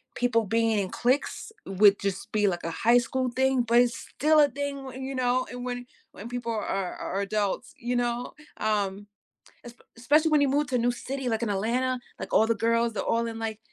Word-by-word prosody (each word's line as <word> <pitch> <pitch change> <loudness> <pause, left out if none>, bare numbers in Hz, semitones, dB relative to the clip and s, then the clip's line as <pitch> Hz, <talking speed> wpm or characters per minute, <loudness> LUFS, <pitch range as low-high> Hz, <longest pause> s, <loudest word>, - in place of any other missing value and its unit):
people 230 -2 +1
being 225 +1 +1
in 190 -2 -2
cliques 260 - -1
would 200 +1 +4
just 195 -1 -4
be, 210 -1 +2
like, 175 -3 -1
a 165 - -3
high 235 +8 +4
school 250 +2 0
thing, 265 0 +2
but 235 +1 +4
it's 245 -1 +2
still 305 +2 +2
a 290 - +6
thing, 270 -1 -5
you 270 0 -4
know, 255 0 +1
and 245 0 -6
when 245 0 -4 0.3
when 220 +4 -9
people 245 -1 -3
are 215 -2 -2 0.3
are 195 +2 -3
adults, 210 +4 -2
you 245 +1 -2
know, 240 0 -1 0.2
um 205 -2 -1 0.9
especially 295 +7 +3
when 305 - +5
you 285 - +4
move 290 +2 +1
to 255 - -2
a - - +4
new 240 +1 +2
city, 265 +2 -5
like, 225 0 -1
in 230 - -1
Atlanta, 245 +6 0 0.2
like, - - -6
all 220 - +5
the 230 - +2
girls, 230 +1 +1
they're - - -2
all 230 0 +1
in, 225 -1 -5
like, 220 -1 -4
235 Hz, 210 wpm, -27 LUFS, 215-255 Hz, 0.9 s, a